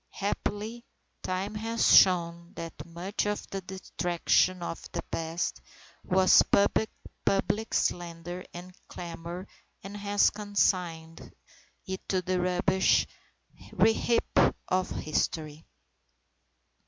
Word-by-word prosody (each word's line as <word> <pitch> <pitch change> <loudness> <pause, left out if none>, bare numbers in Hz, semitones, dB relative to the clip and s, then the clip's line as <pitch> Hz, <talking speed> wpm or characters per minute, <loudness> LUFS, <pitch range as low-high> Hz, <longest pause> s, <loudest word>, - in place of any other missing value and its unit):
Happily, 210 +3 -3 0.4
time 190 +3 -3
has 225 +2 +3
shown 170 -2 +4
that 165 0 -8
much 180 +5 -3
of 210 0 -3
the 195 - -3
detraction 180 -1 0
of 165 - -5
the - - -3
past 165 - -2 0.4
was 185 0 +5
public 205 +1 0
slander 175 +1 -2
and 180 +1 -10
clamour, 170 +1 -7 0.4
and 195 +1 -8
has 205 0 +2
consigned 180 -6 -1 0.5
it 190 -1 -6
to 185 -1 +1
the 185 +1 0
rubbish 185 +1 +2 0.7
heap 225 +1 +3 0.3
of 185 0 0
history. 155 0 -2
185 Hz, 95 wpm, -29 LUFS, 170-200 Hz, 0.7 s, was